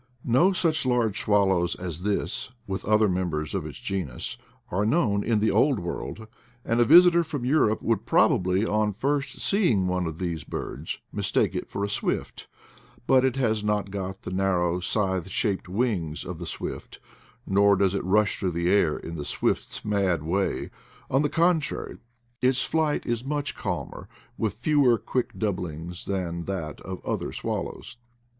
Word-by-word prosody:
No 130 +11 +4
such 165 -4 +1
large 120 -6 +1
swallows 95 -4 +2
as 90 -2 -5
this, 100 +5 -1 0.2
with 95 -1 -4
other 110 +1 +4
members 85 -5 -2
of 90 -6 -2
its 75 - -9
genus, 90 -11 -3 0.4
are 95 +3 +1
known 110 -5 +2
in 115 -2 +1
the 110 - +3
Old 135 -5 +3
World; 90 +5 -5 0.4
and 115 +1 +1
a 120 - +5
visitor 170 +4 +7
from 145 -6 -4
Europe 125 -6 +2
would 115 -1 0
probably, 95 +3 +3
on 105 -1 +1
first 140 +6 -1
seeing 150 - +2
one 90 -1 0
of 80 -1 -5
these 85 -4 -3
birds, - - -5 0.2
mistake - - +1
it - - -4
for 100 - -2
a - - -2
swift; 100 - -3 0.6
but 130 0 +5
it 130 -1 +2
has 110 -5 +1
not 105 -2 0
got 95 -1 -5
the - - -5
narrow, 90 -2 +1
scythe 95 -1 -1
shaped 95 -1 -1
wings 90 - -1
of 90 -2 -6
the 85 - -6
swift, - - -5 0.5
nor 100 +1 +4
does 95 -1 +2
it 100 - -1
rush 100 +3 +2
through 95 - 0
the 85 +1 +1
air 85 -7 +3
in 85 0 -7
the 75 - -4
swift's - - -2
mad 95 -6 +1
way; 95 +5 -1 0.4
on 135 - +3
the 150 - +1
contrary, 165 -2 0 0.4
its 130 +1 +3
flight 155 -2 0
is 120 0 -1
much 145 +1 -2
calmer, - - -5 0.3
with 110 -3 -2
fewer 130 -1 +3
quick 125 +3 -3
doublings 90 -4 -4
than 85 -3 -3
that 85 -6 -4
of 95 -1 -7
other - - -2
swallows. - - -5
100 Hz, 165 wpm, -26 LUFS, 90-120 Hz, 0.6 s, visitor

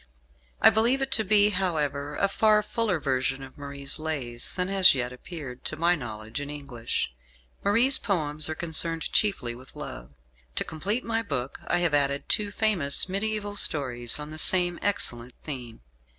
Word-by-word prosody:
I - - +7
believe 230 +5 +2
it 270 - -4
to 220 - +4
be, 205 +1 +4
however, 150 -6 -1
a 200 - +2
far 210 +1 +3
fuller 215 -8 0
version 135 -1 -1
of 130 - -12
Marie's 140 0 -3
"Lays" 135 -7 -2
than 180 -1 -1
has 190 -5 +5
yet 125 -1 -2
appeared, 135 -2 -9
to - - -1
my 170 +3 +2
knowledge, 110 -3 -6
in 145 - -6
English. 130 - -4 0.5
Marie's 235 +7 +4
poems 155 -6 +1
are 155 - -3
concerned 165 0 +1
chiefly 195 - +1
with 130 +2 -14
love. - - -8 0.5
To - - +3
complete 200 +10 -3
my 225 0 0
book 140 - -4
I - - +2
have 170 -3 +1
added 140 -1 +1
two 210 -1 +2
famous 200 -11 +1
mediaeval 205 +1 -2
stories 120 -9 +2
on 150 0 -7
the 155 - -6
same 175 0 +3
excellent 125 -11 -1
theme. 125 - -6
155 Hz, 165 wpm, -26 LUFS, 135-200 Hz, 0.5 s, I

